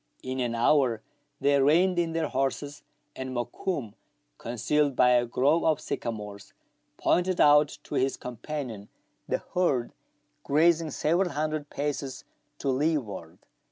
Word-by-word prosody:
In 130 Hz, 0 st, -4 dB
an 120 Hz, -2 st, -1 dB
hour 120 Hz, -2 st, +2 dB, 0.4 s
they 140 Hz, 0 st, +3 dB
reined 175 Hz, +6 st, +4 dB
in 165 Hz, -1 st, 0 dB
their 165 Hz, -1 st, 0 dB
horses, 135 Hz, +2 st, -2 dB, 0.3 s
and 130 Hz, -1 st, -5 dB
Mokoum, 120 Hz, -, -3 dB, 0.5 s
concealed 135 Hz, +5 st, 0 dB
by 125 Hz, 0 st, +5 dB
a 120 Hz, -1 st, +3 dB
grove 140 Hz, +7 st, +2 dB
of 155 Hz, -2 st, +2 dB
sycamores, 105 Hz, -3 st, -6 dB, 0.4 s
pointed 180 Hz, 0 st, +1 dB
out 150 Hz, 0 st, +5 dB
to -, -, -10 dB
his 135 Hz, +1 st, +1 dB
companion 125 Hz, -4 st, -6 dB, 0.4 s
the -, -, -1 dB
herd 140 Hz, -10 st, +1 dB, 0.5 s
grazing 160 Hz, +2 st, +3 dB
several 170 Hz, +6 st, +1 dB
hundred 155 Hz, -1 st, -3 dB
paces 140 Hz, -2 st, -4 dB, 0.3 s
to 140 Hz, -, -2 dB
leeward. 130 Hz, -, -1 dB
140 Hz, 125 wpm, -27 LUFS, 120-155 Hz, 0.5 s, by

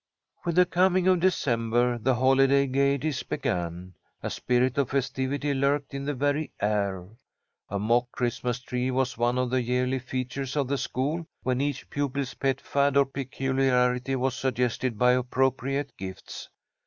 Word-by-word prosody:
With 170 Hz, -1 st, 0 dB
the 180 Hz, 0 st, +6 dB
coming 185 Hz, +1 st, +2 dB
of 185 Hz, -1 st, +4 dB
December 120 Hz, -8 st, +1 dB
the 125 Hz, +3 st, +2 dB
holiday 135 Hz, +2 st, +4 dB
gaieties 140 Hz, +1 st, +1 dB
began. 90 Hz, +1 st, -3 dB, 0.3 s
A -, -, -2 dB
spirit 125 Hz, +1 st, +1 dB
of 135 Hz, -, +1 dB
festivity 140 Hz, +1 st, -1 dB
lurked 140 Hz, +1 st, 0 dB
in 140 Hz, 0 st, -4 dB
the 145 Hz, 0 st, -1 dB
very 145 Hz, +3 st, 0 dB
air. 100 Hz, -3 st, -1 dB, 0.6 s
A 100 Hz, -, -2 dB
mock 120 Hz, +4 st, +1 dB
Christmas 120 Hz, 0 st, -1 dB
tree 125 Hz, 0 st, -2 dB
was 130 Hz, 0 st, 0 dB
one 120 Hz, +2 st, +1 dB
of 125 Hz, -1 st, 0 dB
the 130 Hz, 0 st, +2 dB
yearly 125 Hz, +2 st, 0 dB
features 130 Hz, +2 st, -4 dB
of 140 Hz, -3 st, 0 dB
the 140 Hz, -1 st, 0 dB
school, 155 Hz, +6 st, -2 dB, 0.2 s
when 130 Hz, +1 st, 0 dB
each 140 Hz, -1 st, -2 dB
pupil's 140 Hz, -1 st, -2 dB
pet 135 Hz, -1 st, 0 dB
fad 140 Hz, 0 st, +1 dB
or 140 Hz, -, +6 dB
peculiarity 135 Hz, -1 st, 0 dB
was 130 Hz, 0 st, 0 dB
suggested 125 Hz, -3 st, -1 dB
by 125 Hz, +2 st, +5 dB
appropriate 130 Hz, +2 st, 0 dB
gifts. 95 Hz, -1 st, -8 dB
130 Hz, 155 wpm, -27 LUFS, 125-140 Hz, 0.6 s, the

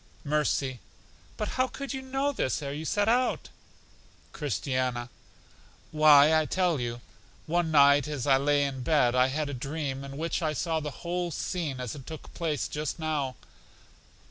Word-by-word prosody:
Mercy: 140 Hz, -3 st, 0 dB, 0.6 s
But 210 Hz, -, -2 dB
how 255 Hz, +4 st, 0 dB
could 275 Hz, +1 st, -6 dB
you 265 Hz, -, -4 dB
know 270 Hz, +2 st, -1 dB
this 150 Hz, -, -1 dB
ere 140 Hz, 0 st, -4 dB
you 155 Hz, +2 st, -5 dB
set 205 Hz, +5 st, +1 dB
out? 245 Hz, +2 st, +1 dB, 0.8 s
Christiana: 130 Hz, -4 st, -2 dB, 0.8 s
Why, 150 Hz, -1 st, +7 dB
I 160 Hz, -, +5 dB
will 155 Hz, -, -1 dB
tell 180 Hz, -5 st, +1 dB
you. 120 Hz, 0 st, -4 dB, 0.4 s
One 170 Hz, +1 st, 0 dB
night 140 Hz, -2 st, +5 dB
as 145 Hz, -5 st, -3 dB
I 135 Hz, -2 st, +5 dB
lay 145 Hz, +1 st, +2 dB
in 135 Hz, -2 st, -3 dB
bed, 125 Hz, -3 st, +3 dB
I 125 Hz, 0 st, +4 dB
had 150 Hz, +3 st, -2 dB
a 145 Hz, -, -5 dB
dream, 135 Hz, +1 st, -4 dB
in 140 Hz, 0 st, -8 dB
which 165 Hz, +3 st, -2 dB
I 155 Hz, -2 st, 0 dB
saw 160 Hz, +2 st, -1 dB
the 150 Hz, -1 st, -4 dB, 0.2 s
whole 175 Hz, 0 st, -1 dB
scene 160 Hz, -4 st, -3 dB
as 125 Hz, -3 st, -4 dB
it 135 Hz, -3 st, -10 dB
took 160 Hz, -1 st, -9 dB
place 160 Hz, -4 st, -2 dB
just 150 Hz, 0 st, -4 dB
now. 150 Hz, -5 st, -2 dB
150 Hz, 170 wpm, -28 LUFS, 135-165 Hz, 0.8 s, Why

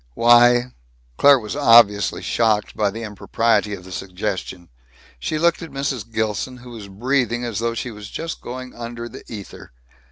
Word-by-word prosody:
"Why 120 Hz, +1 st, +5 dB, 0.2 s
" -, -, -36 dB
Claire 140 Hz, -1 st, +7 dB
was 110 Hz, -1 st, -6 dB
obviously 115 Hz, -7 st, +5 dB
shocked 110 Hz, -3 st, 0 dB
by 105 Hz, -1 st, +1 dB
the 115 Hz, +3 st, -7 dB
impropriety 105 Hz, 0 st, 0 dB
of 90 Hz, -, -13 dB
the 95 Hz, -, -12 dB
suggestion. 90 Hz, -1 st, -5 dB, 0.5 s
She 155 Hz, -, -2 dB
looked 170 Hz, +2 st, +2 dB
at 165 Hz, -, -7 dB
Mrs. 135 Hz, -5 st, -4 dB
Gilson, 110 Hz, +3 st, -2 dB
who 125 Hz, 0 st, -12 dB
was 110 Hz, -4 st, -9 dB
breathing 120 Hz, +3 st, -1 dB
as 115 Hz, -3 st, -3 dB
though 115 Hz, 0 st, -1 dB
she 120 Hz, +1 st, -4 dB
was 105 Hz, -1 st, -10 dB
just 165 Hz, 0 st, -6 dB
going 130 Hz, +1 st, -7 dB
under 120 Hz, 0 st, -7 dB
the -, -, -11 dB
ether. 105 Hz, -3 st, -9 dB
115 Hz, 170 wpm, -21 LUFS, 105-125 Hz, 0.5 s, Claire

